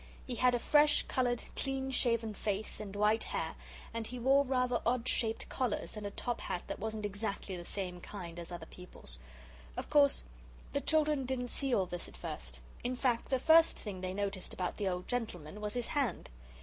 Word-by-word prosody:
He 255 - -3
had 250 +1 +4
a - - +3
fresh 295 +4 +5
coloured, 245 -2 +1
clean 270 -1 -1
shaven 230 -3 +2
face 205 0 -2
and 205 -2 -6
white 210 +2 +3
hair, - - -2 0.4
and 230 -1 -3
he 250 - -6
wore 270 +3 +5
rather 250 -2 +1
odd 245 +1 +1
shaped 225 -3 +1
collars 250 -5 -1
and 210 -1 -4
a - - -3
top 240 +4 -3
hat 175 - -2
that - - -5
wasn't 215 0 -2
exactly 200 -1 -3
the 175 - -6
same 180 -1 -4
kind 175 -4 -7
as 170 +1 -7
other 170 -2 -5
people's. 160 - -9 0.6
Of - - -4
course 285 -2 +5 0.5
the 280 - +1
children 300 -4 +2
didn't 250 -1 -1
see 275 +2 0
all 190 - +3
this 175 -1 -4
at - - -13
first. - - -6 0.2
In 250 +1 0
fact 245 -2 +1
the 265 - +3
first 325 +5 +6
thing 195 -4 -5
they 185 0 -2
noticed 200 -2 -2
about 180 -1 -2
the 205 - 0
old 180 0 -3
gentleman 210 -7 -3
was 210 +1 -3
his 245 -1 0
hand. 265 - 0
225 Hz, 200 wpm, -34 LUFS, 195-255 Hz, 0.6 s, first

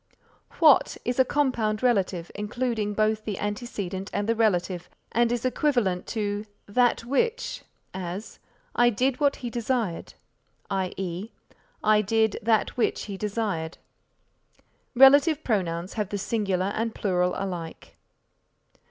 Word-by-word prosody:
What 310 -5 +5
is 245 +2 -1
a - - +8
compound 250 -6 0
relative, 190 -8 +1
including 210 0 -2
both 215 0 +1
the 210 -3 -4
antecedent 205 -3 -4
and 205 +1 -2
the 230 - +3
relative 185 -5 0 0.2
and 235 0 +2
is 240 0 -1
equivalent 245 -8 +1
to 205 -1 -2 0.2
that 240 +2 +2
which; 460 - -1 0.3
as, 185 +3 -6 0.4
"I 240 0 +5
did 255 +4 0
what 285 -1 +3
he 235 - -3
desired," 235 -6 -2 0.6
i. 190 -2 0
e. 190 +2 -4 0.5
"I 215 0 +5
did 220 +1 +1
that 220 0 +1
which 240 - +1
he 200 - -6
desired." 200 -5 -3 1.2
Relative 285 +4 +6
pronouns 180 -5 -1
have 210 -4 -2
the 205 - -2
singular 195 -2 -1
and 225 0 -2
plural 180 -3 +1
alike. 175 -4 -6
215 Hz, 125 wpm, -26 LUFS, 190-240 Hz, 1.2 s, a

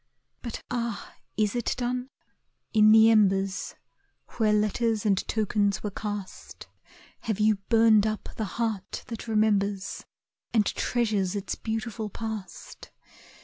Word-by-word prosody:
But 235 -3 -6
ah, 235 -3 -3 0.2
is 215 +1 +1
it 240 - -1
done? 250 +1 -2 0.6
In 215 -1 +6
the 220 +1 +7
embers 195 -3 +2 0.6
Where 220 -2 +3
letters 215 +1 +1
and 200 -2 +4
tokens 205 -2 0
were 210 - -3
cast, 205 -1 -7 0.5
Have 220 -2 -3
you 215 0 +3
burned 225 -2 +5
up 215 -1 -4
the 220 - -2
heart 220 -5 -2
that 230 0 -6
remembers, 205 -2 0 0.5
And 215 -2 +4
treasures 210 -7 0
its 200 - -3
beautiful 220 -1 -4
past? 220 -2 -7
215 Hz, 120 wpm, -27 LUFS, 205-225 Hz, 0.6 s, the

